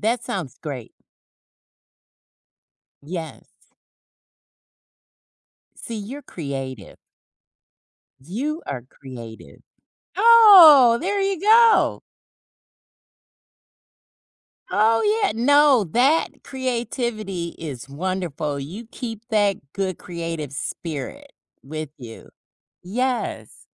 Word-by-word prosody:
That 230 Hz, +3 st, 0 dB
sounds 165 Hz, -11 st, -5 dB
great. 135 Hz, -7 st, -7 dB, 2.1 s
Yes. 165 Hz, 0 st, -7 dB, 2.3 s
See, 230 Hz, -, -8 dB
you're 235 Hz, +8 st, -7 dB
creative. 135 Hz, -, -7 dB, 1.2 s
You 260 Hz, -, -4 dB
are 130 Hz, -3 st, -5 dB
creative. 120 Hz, -3 st, -12 dB, 0.5 s
Oh, 370 Hz, -, +8 dB
there 400 Hz, +4 st, -1 dB
you 390 Hz, -3 st, -1 dB
go. 445 Hz, +2 st, +4 dB, 2.7 s
Oh 225 Hz, +2 st, +2 dB, 0.2 s
yeah. 400 Hz, -, +2 dB
No, 280 Hz, 0 st, +4 dB
that 275 Hz, +7 st, +1 dB
creativity 235 Hz, -8 st, -3 dB
is 140 Hz, -6 st, -7 dB
wonderful, 155 Hz, -2 st, -4 dB
you 185 Hz, +12 st, -8 dB
keep 225 Hz, -4 st, -7 dB
that 205 Hz, -3 st, +2 dB, 0.2 s
good 190 Hz, -3 st, -3 dB
creative 165 Hz, -5 st, -6 dB
spirit 165 Hz, -, -6 dB, 0.3 s
with 155 Hz, +1 st, -7 dB
you. 115 Hz, -4 st, -11 dB, 0.5 s
Yes. 250 Hz, +7 st, -3 dB
205 Hz, 75 wpm, -22 LUFS, -, 2.7 s, Oh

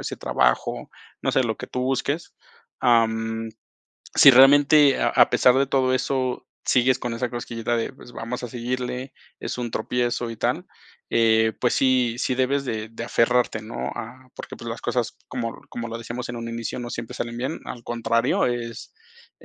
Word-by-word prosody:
ese -, -, -5 dB
trabajo, -, -, 0 dB, 0.3 s
no -, -, 0 dB
sé, 130 Hz, -, +2 dB
lo 110 Hz, -1 st, -2 dB
que -, -, -6 dB
tú 125 Hz, -, -4 dB
busques. 135 Hz, +5 st, -2 dB, 0.5 s
Am, 115 Hz, -2 st, +1 dB, 0.6 s
sí 140 Hz, -, +9 dB
realmente 140 Hz, +2 st, +6 dB
a -, -, +3 dB
a -, -, +5 dB
pesar 125 Hz, +1 st, +4 dB
de 140 Hz, -, +3 dB
todo 130 Hz, -1 st, +1 dB
eso, 130 Hz, 0 st, -1 dB, 0.2 s
sigues 130 Hz, 0 st, +3 dB
con 120 Hz, -, -3 dB
esa 120 Hz, +2 st, -2 dB
cosquillita 120 Hz, -1 st, -3 dB
de, 115 Hz, +3 st, -2 dB
pues, 125 Hz, -2 st, -15 dB
vamos 120 Hz, +3 st, -5 dB
a -, -, -5 dB
seguirle, 125 Hz, +2 st, -4 dB, 0.3 s
es -, -, -4 dB
un 120 Hz, -2 st, -3 dB
tropiezo 120 Hz, +1 st, -1 dB
y 115 Hz, -, -7 dB
tal, -, -, -1 dB, 0.4 s
eh, 110 Hz, -1 st, +3 dB
pues 125 Hz, -, +2 dB
sí 130 Hz, -3 st, +2 dB
sí 130 Hz, -, 0 dB
debes 135 Hz, +2 st, +1 dB
de 110 Hz, -4 st, -4 dB
de 115 Hz, +1 st, -7 dB
aferrarte, 120 Hz, -1 st, +2 dB
¿no? 65 Hz, -, -5 dB
Ah, 130 Hz, +3 st, -8 dB
porque, -, -, -8 dB
pues, 120 Hz, -, -8 dB
las 115 Hz, -, -6 dB
cosas, 120 Hz, -2 st, -2 dB
como 115 Hz, -2 st, -4 dB
como 120 Hz, 0 st, -5 dB
lo 115 Hz, +1 st, -5 dB
decíamos 120 Hz, +2 st, -6 dB
en 120 Hz, -, -5 dB
un 115 Hz, 0 st, -5 dB
inicio, 115 Hz, +1 st, -4 dB
no 120 Hz, -1 st, -5 dB
siempre 115 Hz, +1 st, -6 dB
salen 120 Hz, -1 st, -4 dB
bien. 130 Hz, +6 st, -3 dB
Al 120 Hz, -, -7 dB
contrario, 115 Hz, +1 st, +1 dB
es, 120 Hz, -, -4 dB, 0.5 s
eh, -, -, -17 dB
120 Hz, 185 wpm, -24 LUFS, 115-130 Hz, 0.6 s, sí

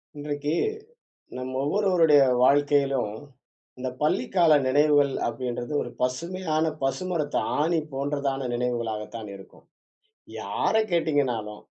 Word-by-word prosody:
இன்றைக்கு, 145 Hz, +1 st, -3 dB, 0.8 s
நம்ம 130 Hz, 0 st, -5 dB
ஒவ்வொருவருடைய 165 Hz, -2 st, +4 dB, 0.2 s
வாழ்க்கையிலும் 140 Hz, -3 st, +3 dB, 0.7 s
"இந்த 130 Hz, 0 st, -3 dB
பள்ளிக்கால 155 Hz, +3 st, +2 dB
நினைவுகள்" 145 Hz, +1 st, +4 dB, 0.2 s
அப்பிடின்றது 120 Hz, +2 st, -4 dB
ஒரு -, -, -7 dB
பசுமையான 160 Hz, +5 st, -1 dB, 0.2 s
பசுமரத்து 145 Hz, +3 st, -1 dB, 0.2 s
ஆணி 165 Hz, +2 st, +2 dB
போன்றதான 140 Hz, 0 st, -2 dB
நினைவுகளாக 120 Hz, -3 st, -2 dB
தான் 110 Hz, -2 st, -7 dB
இருக்கும். 95 Hz, 0 st, -15 dB, 0.8 s
யாரை 440 Hz, -, +1 dB
கேட்டீங்கனாலும், 135 Hz, -11 st, 0 dB
145 Hz, 90 wpm, -25 LUFS, 125-155 Hz, 0.8 s, ஒவ்வொருவருடைய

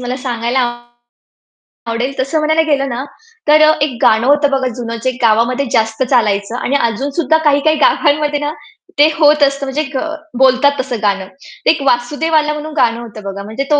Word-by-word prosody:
मला 250 Hz, +1 st, -4 dB
सांगायला 240 Hz, 0 st, -1 dB, 1.3 s
आवडेल 245 Hz, +4 st, -2 dB
तसं 275 Hz, +4 st, -1 dB
म्हणायला 315 Hz, +1 st, +2 dB
गेलं 275 Hz, -1 st, +1 dB
ना, 245 Hz, +2 st, -4 dB, 0.4 s
तर 305 Hz, +1 st, +5 dB
अ, 310 Hz, 0 st, +6 dB
एक 275 Hz, -5 st, -1 dB
गाणं 220 Hz, +2 st, +3 dB
होतं 290 Hz, 0 st, +3 dB
बघा 265 Hz, -1 st, 0 dB
जुनं 230 Hz, -1 st, -4 dB
जे 260 Hz, -, +1 dB
गावामध्ये 235 Hz, +4 st, +2 dB
जास्त 225 Hz, +3 st, 0 dB
चालायचं 220 Hz, -4 st, 0 dB
आणि 270 Hz, -, -2 dB
अजून 235 Hz, +6 st, -3 dB
सुद्धा 315 Hz, +1 st, +1 dB
काही-काही 295 Hz, +2 st, +3 dB
गावांमध्ये 295 Hz, -1 st, +2 dB
ना, 295 Hz, +1 st, -3 dB, 0.5 s
ते 295 Hz, -, +7 dB
होत 300 Hz, -1 st, +4 dB
असतं 275 Hz, 0 st, +1 dB
म्हणजे 280 Hz, +3 st, -2 dB
ग 260 Hz, -, 0 dB, 0.4 s
बोलतात 265 Hz, +2 st, +3 dB
तसं 255 Hz, -4 st, -3 dB
गाणं. 195 Hz, -2 st, -1 dB, 0.4 s
ते -, -, +4 dB
एक 305 Hz, -3 st, -3 dB
वासुदेव 290 Hz, +7 st, 0 dB
आला 300 Hz, 0 st, +2 dB
म्हणून 305 Hz, +1 st, -7 dB
गाणं 230 Hz, 0 st, +2 dB
होतं 215 Hz, -2 st, -10 dB
बघा. 200 Hz, 0 st, -6 dB
म्हणजे 220 Hz, +6 st, -4 dB
तो 295 Hz, -, +4 dB
265 Hz, 185 wpm, -15 LUFS, 235-295 Hz, 1.3 s, ते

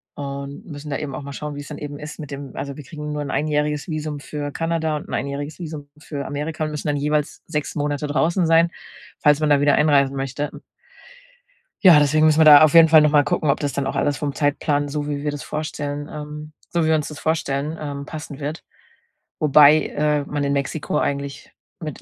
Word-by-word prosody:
und 140 Hz, +5 st, -6 dB
müssen 150 Hz, -4 st, -8 dB
da 140 Hz, -, -2 dB
eben 140 Hz, -2 st, -5 dB
auch 130 Hz, -, -5 dB
mal 140 Hz, -, -7 dB
schauen, 150 Hz, +1 st, -5 dB
wie's 145 Hz, 0 st, -8 dB
dann 150 Hz, -, -7 dB
eben 145 Hz, -1 st, -7 dB
ist 150 Hz, 0 st, -8 dB
mit 150 Hz, -2 st, -8 dB
dem 140 Hz, -1 st, -7 dB
also, 140 Hz, -1 st, -5 dB
wir 150 Hz, -, -9 dB
kriegen 150 Hz, +1 st, -7 dB
nur 150 Hz, 0 st, -3 dB
'n 145 Hz, -, -5 dB
einjähriges 150 Hz, +1 st, -1 dB
Visum 155 Hz, -2 st, -4 dB
für 145 Hz, 0 st, -5 dB
Kanada 165 Hz, -1 st, -1 dB
und -, -, -9 dB
'n -, -, -7 dB
einjähriges 145 Hz, +4 st, -4 dB
Visum 150 Hz, -4 st, -7 dB
für 145 Hz, -2 st, -6 dB
Amerika 150 Hz, +3 st, -4 dB
und 155 Hz, -, -2 dB
müssen 150 Hz, 0 st, -5 dB
dann 145 Hz, -1 st, 0 dB
jeweils 150 Hz, +1 st, -1 dB
6 150 Hz, -2 st, -3 dB
Monate 145 Hz, -1 st, -2 dB
draußen 165 Hz, +4 st, +1 dB
sein, 165 Hz, +1 st, +4 dB, 0.5 s
falls 150 Hz, -1 st, +4 dB
man 155 Hz, -1 st, +1 dB
da 145 Hz, -1 st, +4 dB
wieder 145 Hz, 0 st, +4 dB
einreisen 140 Hz, -3 st, +3 dB
möchte. 135 Hz, +2 st, -3 dB
Hm -, -, -12 dB, 1.2 s
Ja, 170 Hz, -6 st, +9 dB
deswegen 155 Hz, +2 st, +3 dB
müssen 155 Hz, 0 st, +4 dB
wir 160 Hz, -, +6 dB
da 150 Hz, -1 st, +10 dB
auf 155 Hz, +1 st, +4 dB
jeden 165 Hz, -1 st, +9 dB
Fall 155 Hz, -1 st, +8 dB
noch 150 Hz, -1 st, +3 dB
mal 145 Hz, -1 st, +5 dB
gucken, 140 Hz, +4 st, +1 dB
ob 140 Hz, -, -2 dB
das 145 Hz, -2 st, -1 dB
dann 140 Hz, -1 st, -2 dB
auch 135 Hz, -, -3 dB
alles 145 Hz, -1 st, 0 dB
vom 145 Hz, -2 st, -3 dB
Zeitplan, 145 Hz, 0 st, 0 dB
so 145 Hz, 0 st, -3 dB
wie 145 Hz, -1 st, -3 dB
wir 150 Hz, -, -1 dB
das 145 Hz, -, -6 dB
vorstellen, 145 Hz, -1 st, -4 dB
ähm 150 Hz, 0 st, -8 dB, 0.2 s
so 170 Hz, -1 st, 0 dB
wie -, -, +1 dB
wir 160 Hz, -, +4 dB
uns 150 Hz, -, -1 dB
das 150 Hz, -, -8 dB
vorstellen, 155 Hz, -1 st, -1 dB
ähm, 140 Hz, -2 st, -5 dB
passen 150 Hz, -2 st, -8 dB
wird. 150 Hz, +3 st, -4 dB, 0.8 s
Wobei, 150 Hz, 0 st, +6 dB
äh, 150 Hz, -1 st, 0 dB
man 145 Hz, 0 st, -3 dB
in 140 Hz, -, 0 dB
Mexiko 140 Hz, +2 st, -2 dB
eigentlich 140 Hz, 0 st, -3 dB, 0.3 s
mit 155 Hz, -5 st, -7 dB
150 Hz, 225 wpm, -22 LUFS, 145-155 Hz, 1.2 s, da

